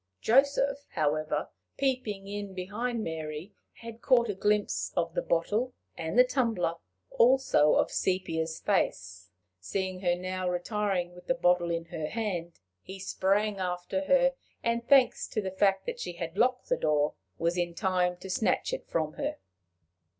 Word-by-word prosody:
Joseph, 280 Hz, -, +2 dB
however, 155 Hz, -1 st, 0 dB, 0.3 s
peeping 250 Hz, -8 st, -1 dB
in 205 Hz, -1 st, -5 dB
behind 220 Hz, +5 st, -3 dB
Mary, 160 Hz, +3 st, -5 dB, 0.2 s
had 230 Hz, 0 st, -10 dB
caught 240 Hz, -3 st, +4 dB
a -, -, 0 dB
glimpse 210 Hz, +2 st, 0 dB
of 165 Hz, -1 st, 0 dB
the -, -, 0 dB
bottle 215 Hz, +9 st, 0 dB, 0.2 s
and 165 Hz, +9 st, -1 dB
tumbler, 230 Hz, -10 st, +1 dB, 0.4 s
also 245 Hz, -, +4 dB
of -, -, +2 dB
Sepia's 165 Hz, -4 st, -1 dB
face. 95 Hz, +1 st, -1 dB, 0.3 s
Seeing 185 Hz, -, -3 dB
her 175 Hz, -2 st, +2 dB
now 185 Hz, 0 st, -3 dB
retiring 180 Hz, -1 st, -1 dB
with 180 Hz, 0 st, -15 dB
the 260 Hz, -, +2 dB
bottle 180 Hz, -6 st, +2 dB
in 170 Hz, 0 st, -2 dB
her 160 Hz, -2 st, -4 dB
hand, 180 Hz, -5 st, -3 dB, 0.2 s
he 190 Hz, -, -9 dB
sprang 195 Hz, +2 st, 0 dB
after 180 Hz, +1 st, -2 dB
her, 270 Hz, +3 st, +4 dB, 0.3 s
and, 235 Hz, 0 st, -1 dB
thanks 270 Hz, -3 st, +4 dB
to -, -, -2 dB
the 190 Hz, -2 st, -3 dB
fact 195 Hz, 0 st, +2 dB
that -, -, -4 dB
she 175 Hz, -, -4 dB
had 170 Hz, 0 st, -6 dB
locked 250 Hz, +4 st, +1 dB
the -, -, +2 dB
door, 150 Hz, -1 st, +1 dB, 0.2 s
was 170 Hz, +1 st, 0 dB
in 175 Hz, -1 st, -1 dB
time 180 Hz, -2 st, +1 dB
to 190 Hz, -, -8 dB
snatch 220 Hz, -, +1 dB
it -, -, -5 dB
from 155 Hz, -2 st, -1 dB
her. -, -, -2 dB
190 Hz, 155 wpm, -29 LUFS, 170-225 Hz, 0.4 s, caught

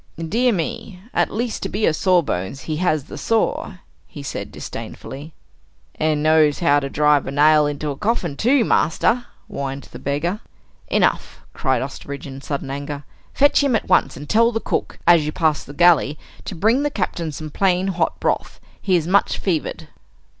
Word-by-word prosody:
"Dear 225 Hz, +10 st, +1 dB
me! 210 Hz, 0 st, -4 dB
At -, -, +2 dB
least 235 Hz, +2 st, -3 dB
to -, -, -3 dB
be 210 Hz, +2 st, 0 dB
a 160 Hz, -, +3 dB
sawbones, 145 Hz, -, 0 dB
he 155 Hz, -1 st, -3 dB
has 155 Hz, -4 st, +1 dB
the -, -, -9 dB
saw!" 225 Hz, -1 st, 0 dB, 0.3 s
he 145 Hz, -, -10 dB
said 140 Hz, -, -5 dB
disdainfully. 145 Hz, +4 st, -8 dB, 0.6 s
"And 155 Hz, -1 st, 0 dB
knows 155 Hz, -2 st, +4 dB
how 145 Hz, -5 st, +3 dB
to 140 Hz, -1 st, -4 dB
drive 150 Hz, 0 st, +2 dB
a -, -, -3 dB
nail 150 Hz, +1 st, +5 dB
into 145 Hz, 0 st, -3 dB
a -, -, -5 dB
coffin 185 Hz, -, -1 dB
too, 245 Hz, -, +3 dB
master," 230 Hz, +10 st, +1 dB, 0.2 s
whined 135 Hz, 0 st, -5 dB
the -, -, -9 dB
beggar. 160 Hz, +8 st, -2 dB, 0.5 s
"Enough!" -, -, 0 dB
cried 130 Hz, -3 st, 0 dB
Osterbridge 140 Hz, +1 st, -7 dB
in 135 Hz, -1 st, -8 dB
sudden 140 Hz, -1 st, -4 dB
anger. 140 Hz, +1 st, -5 dB, 0.3 s
"Fetch 285 Hz, +1 st, +4 dB
him 275 Hz, -4 st, +2 dB
at 220 Hz, -, -2 dB
once, 185 Hz, -, +3 dB
and 145 Hz, +2 st, -8 dB
tell 230 Hz, +5 st, +4 dB
the 225 Hz, -, -1 dB
cook, -, -, -3 dB
as 170 Hz, -3 st, +6 dB
you -, -, -1 dB
pass 155 Hz, -2 st, +1 dB
the -, -, -11 dB
galley, 155 Hz, -2 st, +4 dB, 0.3 s
to 190 Hz, -, -5 dB
bring 220 Hz, -, +2 dB
the 290 Hz, -, +1 dB
Captain 180 Hz, -, -3 dB
some 155 Hz, +1 st, -7 dB
plain 190 Hz, +2 st, +1 dB
hot 175 Hz, -3 st, -1 dB
broth! -, -, -1 dB, 0.2 s
He 190 Hz, -2 st, +2 dB
is 165 Hz, -3 st, +1 dB
much 195 Hz, +4 st, +2 dB
fevered." 170 Hz, -6 st, -2 dB
160 Hz, 180 wpm, -21 LUFS, 145-200 Hz, 0.6 s, as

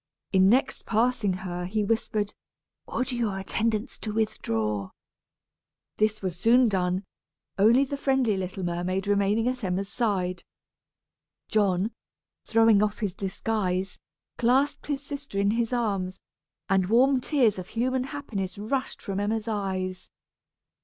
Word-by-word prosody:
In 190 Hz, 0 st, +6 dB
next 255 Hz, +5 st, +1 dB
passing 225 Hz, -2 st, +2 dB
her, 180 Hz, 0 st, -3 dB
he 210 Hz, +3 st, 0 dB
whispered, 210 Hz, -1 st, -1 dB, 0.5 s
"Order 255 Hz, +2 st, -2 dB
your 225 Hz, -5 st, -1 dB
attendants 220 Hz, +4 st, -1 dB
to 215 Hz, -, -4 dB
withdraw." 110 Hz, -, -1 dB, 1.1 s
This 215 Hz, -1 st, +1 dB
was 185 Hz, -3 st, -2 dB
soon 235 Hz, +7 st, +5 dB
done, 185 Hz, -1 st, 0 dB, 0.6 s
only 230 Hz, +7 st, +6 dB
the 280 Hz, +1 st, -3 dB
friendly 265 Hz, -6 st, +2 dB
little 190 Hz, 0 st, -4 dB
mermaid 180 Hz, +2 st, -1 dB
remaining 205 Hz, +3 st, +2 dB
at 250 Hz, -1 st, -2 dB
Emma's 190 Hz, +1 st, -1 dB
side. 185 Hz, -7 st, -1 dB, 1.1 s
John, 200 Hz, 0 st, +2 dB, 0.5 s
throwing 225 Hz, -2 st, +5 dB
off 210 Hz, -1 st, 0 dB
his 205 Hz, -5 st, -2 dB
disguise, 190 Hz, -1 st, -2 dB, 0.4 s
clasped 260 Hz, +5 st, +2 dB
his 285 Hz, -1 st, -2 dB
sister 280 Hz, -7 st, -6 dB
in 200 Hz, +1 st, +3 dB
his 230 Hz, +1 st, 0 dB
arms, 200 Hz, -6 st, -1 dB, 0.5 s
and 190 Hz, -2 st, +2 dB
warm 255 Hz, +3 st, +4 dB
tears 245 Hz, -8 st, +2 dB
of 180 Hz, -, -7 dB
human 255 Hz, +4 st, 0 dB
happiness 220 Hz, -11 st, -5 dB
rushed 260 Hz, +6 st, -3 dB
from 195 Hz, -2 st, -3 dB
Emma's 215 Hz, +2 st, -1 dB
eyes. 190 Hz, -3 st, -3 dB
210 Hz, 130 wpm, -27 LUFS, 190-235 Hz, 1.1 s, In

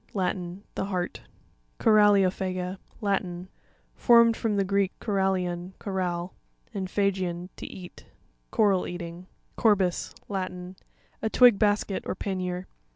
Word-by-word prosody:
—Latin. 185 Hz, 0 st, -2 dB
The -, -, -2 dB
heart. 185 Hz, -3 st, -3 dB, 0.6 s
Cora. 215 Hz, -1 st, +5 dB
opHaca. 185 Hz, -2 st, +1 dB
— -, -, -26 dB
Latin. 185 Hz, -3 st, -2 dB, 0.4 s
Formed 235 Hz, -1 st, +5 dB
from 220 Hz, -2 st, -1 dB
the 200 Hz, -, +2 dB
Greek, 200 Hz, 0 st, +1 dB
korallion, 190 Hz, -3 st, -1 dB
coral, 180 Hz, -2 st, -3 dB, 0.4 s
and 195 Hz, -3 st, -3 dB
phagein, 185 Hz, -3 st, -1 dB
to -, -, -7 dB
eat. 180 Hz, -2 st, -11 dB, 0.4 s
Coral 200 Hz, -4 st, +2 dB
eating. 175 Hz, 0 st, -7 dB, 0.3 s
Cor'sis.— 195 Hz, -5 st, +2 dB
Latin. 185 Hz, -2 st, -4 dB, 0.5 s
A 220 Hz, -, 0 dB
twig 245 Hz, -3 st, +6 dB
basket, 205 Hz, -2 st, +1 dB
or -, -, -2 dB
pannier. 185 Hz, -2 st, -3 dB
190 Hz, 120 wpm, -27 LUFS, 180-200 Hz, 0.6 s, twig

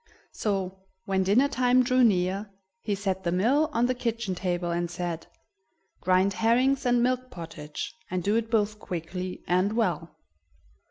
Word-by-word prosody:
So, 190 Hz, -3 st, -2 dB, 0.3 s
when 190 Hz, -1 st, +1 dB
dinner 205 Hz, +9 st, +4 dB
time 255 Hz, -1 st, +3 dB
drew 255 Hz, +1 st, +3 dB
near, 195 Hz, -1 st, +2 dB, 0.3 s
he 205 Hz, -, -2 dB
set 190 Hz, -1 st, -2 dB
the 170 Hz, -, 0 dB
mill 260 Hz, -, +3 dB
on 235 Hz, -3 st, +2 dB
the 255 Hz, -, +1 dB
kitchen 230 Hz, -5 st, -2 dB
table, 175 Hz, -1 st, -2 dB
and 170 Hz, 0 st, -1 dB
said: 175 Hz, -1 st, -4 dB, 0.7 s
"Grind 185 Hz, +2 st, +3 dB
herrings 255 Hz, +5 st, +2 dB
and 245 Hz, -1 st, +3 dB
milk 255 Hz, 0 st, 0 dB
pottage, 165 Hz, -6 st, -7 dB, 0.2 s
and 180 Hz, -1 st, -2 dB
do 205 Hz, +4 st, +2 dB
it 225 Hz, 0 st, 0 dB
both 215 Hz, -2 st, +1 dB
quickly 180 Hz, 0 st, -5 dB
and 185 Hz, +4 st, +2 dB
well." 230 Hz, 0 st, -1 dB
200 Hz, 155 wpm, -27 LUFS, 180-240 Hz, 0.7 s, dinner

